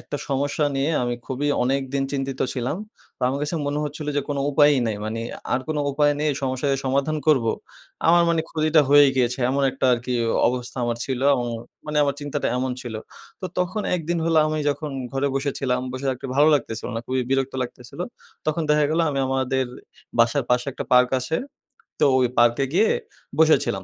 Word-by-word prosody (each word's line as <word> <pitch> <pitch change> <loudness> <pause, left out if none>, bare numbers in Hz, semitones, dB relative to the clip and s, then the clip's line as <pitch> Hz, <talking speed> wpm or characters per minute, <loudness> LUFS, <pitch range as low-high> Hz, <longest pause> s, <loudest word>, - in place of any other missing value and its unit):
একটা - - -5
সমস্যা 145 +2 0
নিয়ে 140 +3 +1
আমি 120 0 -1
খুবই 140 +2 -2
অনেকদিন 135 +1 0
চিন্তিত 135 -1 -3
ছিলাম। 125 +4 -2 0.4
তো - - -10
আমার 135 +2 -1
কাছে 150 +3 -2
মনে 145 +1 -1
হচ্ছিল 150 +1 -6
যে - - +3
কোনো 140 -1 -1
উপায়ই 145 0 +5
নাই। 110 -2 -1
মানি 110 +1 -3 0.3
আর 125 - +2
কোনো 155 -1 0
উপায় 145 +1 +3
নেই 150 0 +2
সমস্যার 130 +1 -1
যে - - -2
সমাধান 140 +4 +1
করব। 145 -6 +4 0.6
আমার 170 +1 +6
মানি 165 -1 +2
ক্ষতিটা 155 0 +3
হয়েই 145 -1 +7
গিয়েছে, 125 0 +1
এমন 140 +1 0
একটা 135 - -4
আরকি 125 +1 -1 0.4
অবস্থা 125 0 -4
আমার 120 -1 -1
ছিল। 130 -2 -3
এবং 120 -2 -1 0.4
মানি 150 0 -3
আমার 140 -1 0
চিন্তাটা 145 -1 -2
এমন 130 +1 -1
ছিল। 120 -3 -6 0.5
তো, - - -6
তখন 180 +4 -1
এক 180 - -1
দিন 175 0 +1
হল 165 0 +1
আমি 155 0 -1
যখন 150 +1 -4 0.2
ঘরে 135 +1 0
বসে 135 +1 0
ছিলাম, 125 -2 0
বসে 130 +2 -4
থাকতে 130 0 -5
ভালো 150 +2 +6
লাগতেছিল 115 -5 -2
না। - - -1
খুবই 130 0 0
বিরক্ত 135 0 +1
লাগতেছিল। 125 +4 -9 0.5
তখন 155 +2 0
দেখা 150 0 +4
গেলো 165 +2 +2
আমি 140 - -2
আমাদের 130 0 0 0.5
বাসার 115 +4 +3
পাশে 125 +1 +2
একটা - - -5
পার্ক 125 0 +6
আছে, 130 +6 -1 0.6
তো - - +4
ওই 125 - +3
পার্কে 120 +3 +4
গিয়ে 205 +6 +4 0.5
বসেছিলাম। - - +3
135 Hz, 190 wpm, -23 LUFS, 125-150 Hz, 0.6 s, হয়েই